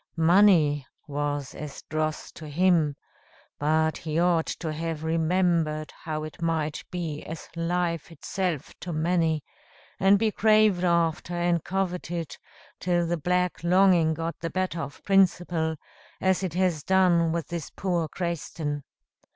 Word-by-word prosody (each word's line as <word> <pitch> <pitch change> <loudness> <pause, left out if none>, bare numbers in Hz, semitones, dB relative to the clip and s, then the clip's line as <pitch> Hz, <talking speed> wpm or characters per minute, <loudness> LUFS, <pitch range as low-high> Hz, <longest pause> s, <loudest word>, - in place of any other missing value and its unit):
Money 165 -5 +4 0.2
was 145 -2 -3
as 150 -2 -8
dross 155 0 -3
to 155 - -10
him; 160 -2 +2 0.6
but 155 +1 +2
he 155 -1 -4
ought 170 -1 +3
to 160 -3 -3
have 160 0 -4
remembered 160 -1 +1
how 155 -1 -3
it 155 +2 -9
might 160 -2 -1
be 165 -5 -4
as 160 0 -7
life 170 -1 -1
itself 165 0 -3
to 180 - -6
many, 160 -1 +1 0.6
and 195 +1 +5
be 220 +1 +1
craved 215 -4 +4
after, 170 0 +1
and 175 -1 +1
coveted, 175 -4 -3 0.4
till 175 -1 +1
the 170 +1 0
black 180 +2 0
longing 175 -3 +4
got 165 +1 -3
the 165 - -3
better 185 -1 -2
of 140 -1 -8
principle, 175 -4 +2 0.4
as 190 0 +2
it 180 -4 -3
has 180 -4 +1
done 175 -2 +3
with 165 -1 -3
this 170 -3 -4
poor 175 -4 -1
Crayston. 160 -3 -3
170 Hz, 135 wpm, -26 LUFS, 155-180 Hz, 0.6 s, and